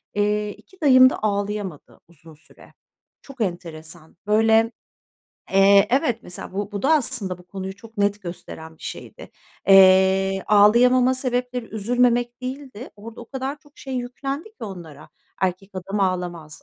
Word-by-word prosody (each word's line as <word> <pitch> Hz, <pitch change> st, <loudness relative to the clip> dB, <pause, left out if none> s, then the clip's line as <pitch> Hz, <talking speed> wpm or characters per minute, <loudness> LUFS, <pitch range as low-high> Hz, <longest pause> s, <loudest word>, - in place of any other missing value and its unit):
eee, 210 Hz, 0 st, 0 dB
2 380 Hz, -2 st, -22 dB
dayım 255 Hz, -3 st, +7 dB
da -, -, -5 dB
ağlayamadı 200 Hz, -5 st, -3 dB
uzun 165 Hz, -1 st, -17 dB
süre. 155 Hz, +1 st, -20 dB, 0.5 s
Çok 270 Hz, -3 st, -11 dB
enteresan, 170 Hz, -3 st, -6 dB
böyle, 225 Hz, +1 st, +3 dB, 0.8 s
eee 195 Hz, +1 st, +6 dB
Evet. 260 Hz, -2 st, +1 dB
Mesela 180 Hz, -, -9 dB
bu 205 Hz, +2 st, -4 dB
bu 200 Hz, -, -4 dB
da 285 Hz, -, +3 dB
aslında 240 Hz, -, -1 dB
bu 180 Hz, -, -18 dB
konuyu 190 Hz, +1 st, -7 dB
çok 225 Hz, +2 st, -16 dB
net 205 Hz, 0 st, 0 dB
gösteren 160 Hz, -2 st, -9 dB
bir -, -, -19 dB
şeydi. -, -, -9 dB, 0.4 s
Eee, 190 Hz, 0 st, +5 dB
ağlayamama 245 Hz, +5 st, +5 dB
sebepleri 250 Hz, -1 st, -2 dB
üzülmemek 240 Hz, +3 st, 0 dB
değildi, 255 Hz, -2 st, -7 dB
orada 225 Hz, +3 st, -11 dB
o 235 Hz, -, -11 dB
kadar 270 Hz, +2 st, -4 dB
çok 290 Hz, 0 st, -25 dB
şey 265 Hz, -1 st, -7 dB
yüklendi 265 Hz, +4 st, -4 dB
ki 430 Hz, -, -10 dB
onlara, 165 Hz, -7 st, -10 dB, 0.3 s
"Erkek 190 Hz, +1 st, -2 dB
adam 195 Hz, +2 st, -4 dB
ağlamaz, 175 Hz, -5 st, -3 dB
210 Hz, 145 wpm, -22 LUFS, 190-250 Hz, 0.8 s, dayım